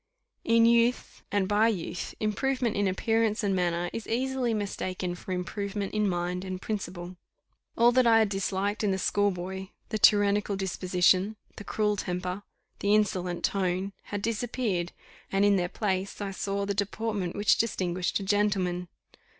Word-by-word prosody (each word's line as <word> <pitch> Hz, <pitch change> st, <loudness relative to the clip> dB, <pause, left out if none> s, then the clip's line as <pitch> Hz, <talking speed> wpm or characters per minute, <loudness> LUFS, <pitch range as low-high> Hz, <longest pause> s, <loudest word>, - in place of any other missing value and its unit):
In 230 Hz, 0 st, +4 dB
youth, 235 Hz, +1 st, +2 dB
and 200 Hz, -2 st, +1 dB
by 210 Hz, +3 st, +4 dB
youth, 180 Hz, -5 st, -3 dB
improvement 235 Hz, +3 st, 0 dB
in 200 Hz, 0 st, +1 dB
appearance 225 Hz, +3 st, +1 dB
and 195 Hz, -2 st, +1 dB
manner 175 Hz, -1 st, 0 dB
is 225 Hz, -, -5 dB
easily 255 Hz, +1 st, 0 dB
mistaken 185 Hz, -4 st, -3 dB
for 180 Hz, +1 st, -8 dB
improvement 200 Hz, +2 st, -3 dB
in 210 Hz, -1 st, +1 dB
mind 180 Hz, 0 st, -2 dB
and 185 Hz, -1 st, -5 dB
principle. 180 Hz, -4 st, -5 dB, 0.6 s
All 235 Hz, +1 st, +6 dB
that 250 Hz, 0 st, +4 dB
I 225 Hz, -1 st, +6 dB
had 220 Hz, -2 st, +3 dB
disliked 195 Hz, +2 st, -1 dB
in 210 Hz, -, +2 dB
the 190 Hz, -, +1 dB
schoolboy 190 Hz, -1 st, -1 dB, 0.2 s
the 215 Hz, -, -2 dB
tyrannical 205 Hz, -1 st, +4 dB
disposition 185 Hz, +1 st, +2 dB, 0.2 s
the 205 Hz, -, -7 dB
cruel 210 Hz, 0 st, 0 dB
temper 180 Hz, +1 st, -3 dB, 0.4 s
the 205 Hz, +1 st, +3 dB
insolent 185 Hz, -4 st, 0 dB
tone 190 Hz, 0 st, 0 dB
had 205 Hz, -1 st, -5 dB
disappeared, 220 Hz, -6 st, -1 dB, 0.4 s
and 195 Hz, +1 st, +3 dB
in 205 Hz, -1 st, +5 dB
their 180 Hz, -2 st, 0 dB
place 195 Hz, -2 st, -2 dB
I 200 Hz, -1 st, -3 dB
saw 200 Hz, +1 st, -2 dB
the 200 Hz, -, -1 dB
deportment 200 Hz, -2 st, -2 dB
which 205 Hz, 0 st, +3 dB
distinguished 185 Hz, -5 st, 0 dB
a -, -, -5 dB
gentleman. 190 Hz, -3 st, +1 dB
200 Hz, 155 wpm, -28 LUFS, 185-215 Hz, 0.6 s, All